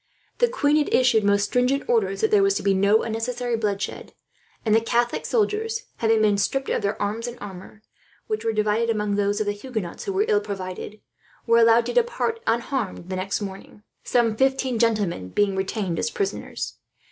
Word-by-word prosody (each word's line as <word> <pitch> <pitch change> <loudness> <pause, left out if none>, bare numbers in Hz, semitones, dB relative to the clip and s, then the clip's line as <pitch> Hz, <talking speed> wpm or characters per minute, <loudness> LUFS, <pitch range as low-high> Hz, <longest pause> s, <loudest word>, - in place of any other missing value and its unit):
The 485 - +5
queen 300 -12 +2
had 300 - 0
issued 240 -4 +4
most 200 0 +3
stringent 250 +6 +1
orders 450 -4 +1
that 440 - +2
there 420 -2 +5
was 395 0 +3
to - - -2
be 200 - +3
no 200 +3 +3
unnecessary 235 +2 -2
bloodshed; 205 -3 -3 0.5
and 215 - +3
the 225 - +5
Catholic 240 +1 0
soldiers, 445 +1 0
having 225 -1 +2
been 205 -1 +3
stripped 270 +7 -1
of - - 0
their 200 0 -2
arms 215 +4 -2
and 240 0 -7
armour, 200 +2 -10 0.4
which 430 -1 -3
were 225 - +1
divided 215 +2 +1
among 210 -2 0
those 205 +1 +1
of 215 - 0
the 205 - 0
Huguenots 205 -4 -5
who 395 - -2
were 400 +2 +2
ill 425 -2 +3
provided, 195 +1 -6 0.4
were 230 0 +4
allowed 230 0 +5
to - - -3
depart 475 -1 0
unharmed 230 -6 -2
the 190 - -2
next 190 +3 -2
morning, 195 +1 -8 0.2
some 230 -3 +2
fifteen 265 -1 +1
gentlemen 205 - 0
being 200 - +1
retained 190 -2 -2
as - - 0
prisoners. 430 -4 -4
225 Hz, 190 wpm, -24 LUFS, 205-270 Hz, 0.5 s, The